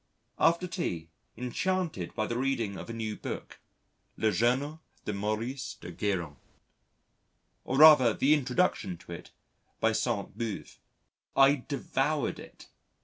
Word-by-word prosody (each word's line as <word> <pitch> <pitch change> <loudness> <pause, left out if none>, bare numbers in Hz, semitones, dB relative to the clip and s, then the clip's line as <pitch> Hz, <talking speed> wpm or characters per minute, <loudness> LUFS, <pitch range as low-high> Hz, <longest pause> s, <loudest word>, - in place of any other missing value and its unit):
After 170 +2 +3
tea, 85 - -4 0.3
enchanted 155 - -2
by 110 -2 0
the 120 - -3
reading 120 -5 -1
of - - -8
a - - -3
new 110 -2 -3
book - - -7 0.6
Le 110 -1 +2
Journal 130 - +1 0.2
de 105 - -2
Maurice 110 +6 -3
de 85 - -9
Guérin 85 -6 -2 1.3
or 130 - -1
rather 150 -6 +9
the 135 +7 +3
introduction 125 - +1
to 85 - -14
it 85 - -8 0.5
by - - +3
Sainte - - -1
Beuve. 115 -4 -5 0.6
I 135 -1 +5
devoured 140 +1 -1
it! - - -13
120 Hz, 130 wpm, -30 LUFS, 105-145 Hz, 1.3 s, rather